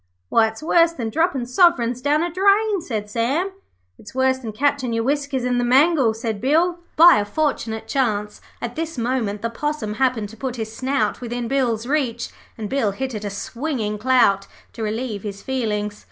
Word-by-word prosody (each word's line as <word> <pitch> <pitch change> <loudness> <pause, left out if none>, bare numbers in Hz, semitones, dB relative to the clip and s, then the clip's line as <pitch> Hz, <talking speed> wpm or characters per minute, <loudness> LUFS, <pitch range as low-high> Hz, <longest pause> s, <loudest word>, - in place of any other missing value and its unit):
'Why, 225 -1 +4
it's 220 +7 -8
worse 335 +1 +4
than 230 -8 -4
droppin' 315 -5 +1
soverins 250 -4 +3
down 295 +4 +2
a 345 - -2
drain,' 400 +1 +3
said 215 -8 -4
Sam. 265 - 0 0.5
'It's 210 - -13
worse 260 0 +2
than 230 -4 -6
catchin' 260 +1 0
your 230 0 0
whiskers 280 0 -1
in 250 -1 +1
the - - +1
mangle,' 265 -1 +4
said 225 -3 -4
Bill. 335 +7 +2 0.2
By 340 +2 +8
a 205 - +1
fortunate 225 -2 -2
chance, 210 -6 -1 0.2
at 240 0 -4
this 325 -2 -4
moment 230 -4 -1
the 230 - -1
Possum 295 -5 -3
happened 245 -6 +1
to 225 - -13
put 255 +1 -4
his 220 -2 -5
snout 260 -5 -1
within 240 0 -3
Bill's 240 -4 0
reach, 255 -4 -1 0.3
and 215 -2 -4
Bill 225 -5 0
hit 265 +4 -4
it 210 -1 -5
a 205 - -2
swinging 220 +1 -3
clout 220 -5 +3 0.3
to 230 - -8
relieve 220 0 -3
his 200 -1 -7
feelings. 210 -5 -2
245 Hz, 185 wpm, -22 LUFS, 220-285 Hz, 0.5 s, By